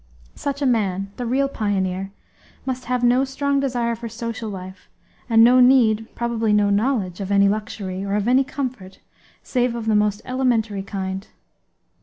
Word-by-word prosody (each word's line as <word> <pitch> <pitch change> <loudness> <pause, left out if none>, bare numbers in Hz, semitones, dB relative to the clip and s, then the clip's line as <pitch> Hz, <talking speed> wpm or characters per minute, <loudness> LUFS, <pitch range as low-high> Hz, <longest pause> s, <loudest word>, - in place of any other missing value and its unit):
Such 280 0 -4
a - - +2
man, 195 -5 0
the 245 - -3
real 270 +3 +1
pioneer, 195 -5 -2 0.5
must 255 -1 -3
have 250 0 -1
no 245 +2 +4
strong 280 +1 0
desire 245 -4 0
for 230 0 -7
social 230 0 -5
life 190 -1 -9 0.4
and 225 -1 +6
no 250 +2 +6
need, 235 -4 +4
probably 230 -2 0
no 205 -1 +3
knowledge, 205 -4 0
of 195 0 -4
any 200 0 +5
luxury, 200 -2 -3
or 200 0 -2
of 210 +1 0
any 255 +2 +4
comfort 255 -9 -5 0.5
save 245 -2 0
of 230 -2 -4
the 220 - +2
most 210 0 +1
elementary 235 -6 0
kind. 190 0 -5
225 Hz, 165 wpm, -22 LUFS, 200-250 Hz, 0.5 s, and